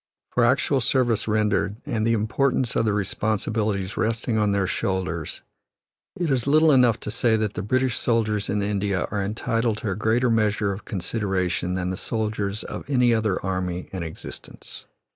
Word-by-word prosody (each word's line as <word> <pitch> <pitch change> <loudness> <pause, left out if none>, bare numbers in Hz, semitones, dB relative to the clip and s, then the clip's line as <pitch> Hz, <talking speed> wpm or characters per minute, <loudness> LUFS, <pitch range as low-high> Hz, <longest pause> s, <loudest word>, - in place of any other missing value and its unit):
For - - +2
actual 135 -2 +2
service 120 -3 +1
rendered, 105 -2 +1
and 110 -1 -1
the 115 - +3
importance 120 +3 +1
of - - +2
the 110 - +2
responsibilities 105 -1 -1
resting 115 +1 0
on 105 -2 +2
their 100 -1 +1
shoulders, 90 -4 -2 0.8
it 170 -4 0
is 130 -1 +1
little 155 +2 +5
enough 125 -5 +4
to 105 - -4
say 115 0 +2
that 105 -1 -1
the - - -3
British 130 +5 0
soldiers 110 -3 0
in 100 0 0
India 100 -2 0
are 105 - -1
entitled 115 +2 -1
to 105 -2 -3
a - - -2
greater 115 +4 +2
measure 105 -2 +1
of 95 - -9
consideration 90 -2 -1
than 90 0 -2
the 95 - -4
soldiers 105 -1 -2
of - - -6
any 125 -3 +4
other 110 -4 +1
army 90 -1 -3
in 95 - -3
existence. 80 -1 -9
105 Hz, 170 wpm, -24 LUFS, 100-115 Hz, 0.8 s, little